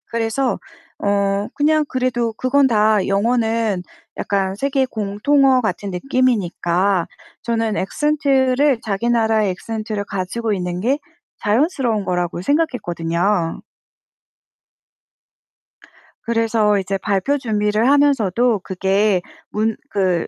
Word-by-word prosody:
그래서 230 +3 -1 0.4
어 200 0 0
그냥 305 +1 +2
그래도 240 -3 -1
그건 265 +4 +2
다 215 -3 +3
영어는 225 -1 +1 0.3
약간 195 -1 -1
세계 270 +4 0
공통어 255 +5 +2
같은 210 -3 -3
느낌이니까 190 -5 0 0.3
저는 225 -2 -1
엑센트를 275 +1 +1
자기 215 +2 -1
나라의 220 -3 +2
액센트를 215 +2 -4
가지고 205 +4 -3
있는 180 -2 -3
게 260 +9 0 0.4
자연스러운 230 - +1
거라고 175 -1 -2
생각했거든요. 175 - 0 2.6
그래서 225 -3 +1
이제 195 0 -2
발표 205 +9 0
준비를 215 -2 0
하면서도 245 -6 +3
그게 195 +1 +1 0.3
문 215 +1 -1
그 185 -4 0
220 Hz, 245 characters per minute, -19 LUFS, 195-255 Hz, 2.6 s, 다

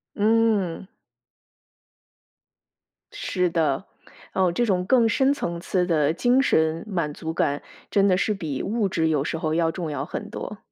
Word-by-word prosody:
嗯。 210 -4 +1 2.3
是 180 -1 -1
的， 160 0 0 0.5
哦， 185 -2 +2
这 240 +8 +1
种 185 -5 +1
更 235 +1 +4
深 265 +5 +3
层 170 -11 -4
次 180 -1 0
的 155 -4 +2
精 245 +9 +3
神 160 - +1
满 170 -7 -1
足 160 +2 -5
感， 145 -3 0 0.3
真 200 -1 +4
的 185 -2 +3
是 210 +3 +1
比 155 -9 -4
物 215 -2 0
质 160 -2 +1
有 150 -3 +1
时 160 - -3
候 155 -2 -1
要 165 0 +2
重 165 -4 -4
要 140 -2 -3
很 - - -6
多。 - - -6
175 Hz, 170 characters per minute, -24 LUFS, 160-205 Hz, 2.3 s, 更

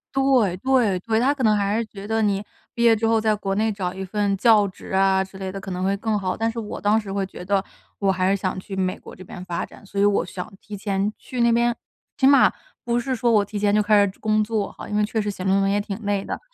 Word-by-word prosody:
对 255 -9 +3
对 230 -5 +2
对， 220 +3 0
他 270 +4 +3
可 265 -3 -4
能 215 -1 +4
还 205 +1 0
是 230 - -1
觉 200 -2 -10
得 220 0 0
你 200 -1 +1 0.3
毕 235 - -1
业 230 -1 +6
之 225 +1 0
后 225 0 +3
在 215 -1 +2
国 195 -2 -2
内 220 +1 +1
找 185 -3 -3
一 190 0 -6
份 200 +1 0
教 210 0 +4
职 185 - -12
啊 190 0 +3
之 190 0 -12
类 190 -1 -4
的 195 - -6
可 190 - -7
能 180 +1 -3
会 195 +1 +1
更 215 +1 -1
好。 185 -2 -2
但 225 0 -1
是 230 - -5
我 210 - -6
当 210 +2 +3
时 200 -3 -7
会 195 -1 -1
觉 180 -1 -10
得， 195 0 +1 0.4
我 195 -1 +2
还 185 0 +1
是 195 - +3
想 185 0 -2
去 195 +1 -8
美 185 -1 -1
国 - - -12
这 185 - -11
边 180 0 -9
发 175 -2 -3
展， - - -16
所 200 0 -5
以 - - +4
我 205 -4 +3
想 180 0 -7
提 210 - -9
前 200 0 -1
去 250 -2 -5
那 235 0 +4
边。 235 0 +2 0.4
起 265 - +4
码 280 0 +6 0.3
不 240 0 +1
是 260 +1 -2
说 235 0 +1
我 210 -2 +4
提 205 +1 -6
前 205 0 +1
就 210 - +4
开 210 0 +4
始 - - -1
准 - - -27
工 215 0 +2
作 215 -2 -2
哈， - - -9
因 210 - -4
为 210 - +3
确 220 +2 -1
实 210 -1 -1
写 185 - -7
论 190 +1 +2
文 195 0 +2
也 205 0 +1
挺 205 0 -6
累 200 -1 0
的， - - -5
205 Hz, 310 characters per minute, -23 LUFS, 195-225 Hz, 0.4 s, 业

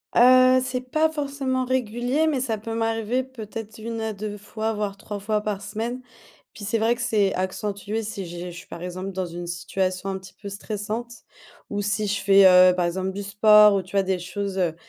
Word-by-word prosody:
Heu, 255 +1 +7
c'est 255 -1 -4
pas 315 +2 +3
forcément 275 -4 -2
régulier, 250 +4 0
mais 290 -4 +1
ça 230 -4 -1
peut 225 +2 -6
m'arriver 225 +2 0
peut-être 225 -3 -8
1 225 +1 -5
à 220 -1 -2
2 210 +1 -5
fois, 220 +2 -3
voir 205 -2 -3
3 205 0 -6
fois 210 +1 -1
par 210 -2 -3
semaine. 225 +5 -4 0.5
Puis 210 - -10
c'est 215 +3 0
vrai 230 +2 +2
que 245 - -7
c'est 210 -4 +1
accentué 200 +3 -3
si 205 -3 -5
j'ai 175 +1 -7
je - - -10
suis, - - -11
par 170 - -9
exemple, 185 +2 -5
dans 190 -1 -3
une 175 0 -7
situation 185 +2 -2
un 190 - -2
petit 190 0 -13
peu 205 - -7
stressante. 215 +3 -5 0.6
Ou 205 0 -2
si 205 +1 -1
je 200 0 -1
fais, 195 0 +6
heu, 180 0 +7
par 180 -1 +1
exemple 185 +2 -2
du 200 +2 -5
sport 210 +1 +6
ou 195 - +1
tu 185 +2 -11
vois 195 - +5
des 190 -1 0
choses, 195 +2 -4
heu, 175 -4 0
210 Hz, 215 wpm, -24 LUFS, 195-230 Hz, 0.6 s, Heu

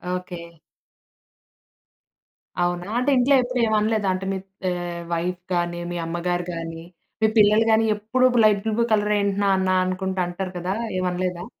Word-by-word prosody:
Okay. 180 -1 -6 2.2
అవునా? 175 +2 -2
అంటే 250 +3 +1
ఇంట్లో 270 +3 +4
ఎప్పుడు 250 0 -3
ఏమి 220 -1 +1
అనలేదా? 215 -2 0
అంటే 190 +1 -4
మీ - - -2 0.3
ఆహ్, 175 -1 -4
వైఫ్ 175 +2 -2
గాని, 175 0 -1
మీ - - -4
అమ్మగారు 175 +1 -2
గాని, 165 0 -6 0.4
మీ 220 - +5
పిల్లలు 215 +2 +5
గాని 220 0 +4
ఎప్పుడు 225 +5 +1 0.2
లైట్ 205 -2 +4
బ్లూ 235 0 +2
కలర్ 210 0 +2
ఏంటి 200 -1 0
నాన్న? 190 -1 +2 0.2
అనుకుంట 190 +1 -3
అంటారు 185 +1 -5
కదా! 185 +2 -2 0.3
ఏమనలేదా? 180 0 -2
185 Hz, 145 wpm, -23 LUFS, 175-215 Hz, 2.2 s, మీ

